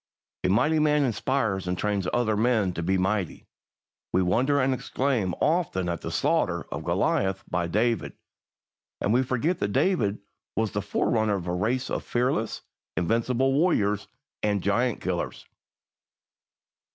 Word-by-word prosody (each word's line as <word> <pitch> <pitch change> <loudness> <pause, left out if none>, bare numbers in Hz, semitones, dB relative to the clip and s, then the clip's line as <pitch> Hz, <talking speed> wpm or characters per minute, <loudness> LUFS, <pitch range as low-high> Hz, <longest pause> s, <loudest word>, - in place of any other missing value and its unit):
A 90 - +2
mighty 130 +11 +3
man 150 -1 +3
inspires 115 -6 0
and 90 0 -1
trains 100 -2 -1
other 115 -3 +1
men 110 -4 +2
to 85 - -4
be 95 +3 +1
mighty. 95 -1 -1 0.7
We 95 - +3
wonder 130 +10 +2
and 130 0 +2
exclaim 125 -7 -1
often 150 - +1
at 85 -1 -2
the - - -4
slaughter - - 0
of - - -4
Goliath 95 0 0
by 90 -1 -1
David, 110 +5 0 0.9
and 105 - +1
we 125 - +4
forget 130 +7 0
that 100 0 -1
David 110 - +2 0.4
was 110 -1 0
the 105 - -2
forerunner 105 +1 +1
of 90 -3 -4
a 90 - -2
race 120 +8 -1
of - - -2
fearless, 120 -2 -1 0.3
invincible 120 +8 +1
warriors 120 - +2 0.3
and 105 -3 0
giant 115 +4 +1
killers. 90 -2 -3
110 Hz, 145 wpm, -26 LUFS, 95-130 Hz, 0.9 s, we